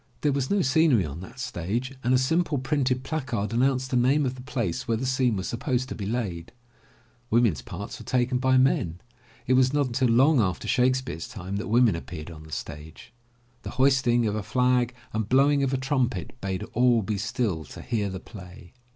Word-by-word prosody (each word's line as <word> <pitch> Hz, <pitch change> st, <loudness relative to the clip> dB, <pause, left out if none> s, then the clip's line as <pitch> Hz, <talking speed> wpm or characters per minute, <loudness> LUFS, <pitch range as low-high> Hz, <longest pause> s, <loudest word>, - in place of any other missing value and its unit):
There 145 Hz, -, +2 dB
was 135 Hz, -1 st, -1 dB
no 200 Hz, -2 st, +2 dB
scenery 135 Hz, -, +3 dB
on 75 Hz, +2 st, -7 dB
that 95 Hz, +8 st, -11 dB
stage 120 Hz, +2 st, -3 dB
and 125 Hz, -, +1 dB
a 130 Hz, -, +5 dB
simple 155 Hz, +4 st, +1 dB
printed 130 Hz, -1 st, 0 dB
placard 120 Hz, -10 st, -3 dB
announced 130 Hz, +1 st, +1 dB
the -, -, +1 dB
name 135 Hz, +4 st, +3 dB
of 125 Hz, -, -1 dB
the 130 Hz, -, -10 dB
place 120 Hz, -, -3 dB
where 115 Hz, -1 st, +1 dB
the 130 Hz, -, -3 dB
scene 130 Hz, -3 st, +1 dB
was 95 Hz, -1 st, -3 dB
sup 115 Hz, -, -4 dB
posed 130 Hz, -1 st, -1 dB
to -, -, -3 dB
be 100 Hz, -3 st, -5 dB
laid. 100 Hz, -8 st, -3 dB, 0.8 s
Women's 115 Hz, -, +2 dB
parts 100 Hz, +6 st, -7 dB
were -, -, -10 dB
taken 125 Hz, 0 st, +1 dB
by 130 Hz, 0 st, +3 dB
men. 95 Hz, -10 st, +2 dB, 0.5 s
It 130 Hz, -, +2 dB
was 130 Hz, +1 st, +4 dB
not 145 Hz, -, +2 dB
i6o -, -, +4 dB
THE -, -, -2 dB
LATCH 120 Hz, +1 st, -3 dB
KEY 130 Hz, -, +3 dB
until 115 Hz, -2 st, +3 dB
long 150 Hz, -5 st, +4 dB
after 95 Hz, -3 st, -2 dB
Shakespeare's 130 Hz, -8 st, 0 dB
time 95 Hz, 0 st, -6 dB
that 110 Hz, +4 st, -4 dB
women 115 Hz, -3 st, +4 dB
appeared 85 Hz, -1 st, -7 dB
on 80 Hz, -1 st, -11 dB
the 80 Hz, -, -14 dB
stage. 75 Hz, -, -8 dB, 0.5 s
The -, -, -6 dB
hoisting 130 Hz, -3 st, +3 dB
of 105 Hz, -, 0 dB
a 105 Hz, -, -2 dB
flag 125 Hz, +3 st, +1 dB, 0.2 s
and 110 Hz, -1 st, -2 dB
blowing 140 Hz, +2 st, +4 dB
of 135 Hz, -1 st, +1 dB
a 135 Hz, -, +1 dB
trumpet 130 Hz, -, -1 dB
bade 95 Hz, -1 st, -3 dB
all 120 Hz, -2 st, +3 dB
be 105 Hz, 0 st, -2 dB
still 105 Hz, -5 st, -1 dB
to -, -, -10 dB
hear 110 Hz, -4 st, -1 dB
the 95 Hz, 0 st, -5 dB
play. 90 Hz, -1 st, -12 dB
125 Hz, 220 wpm, -26 LUFS, 100-130 Hz, 0.8 s, a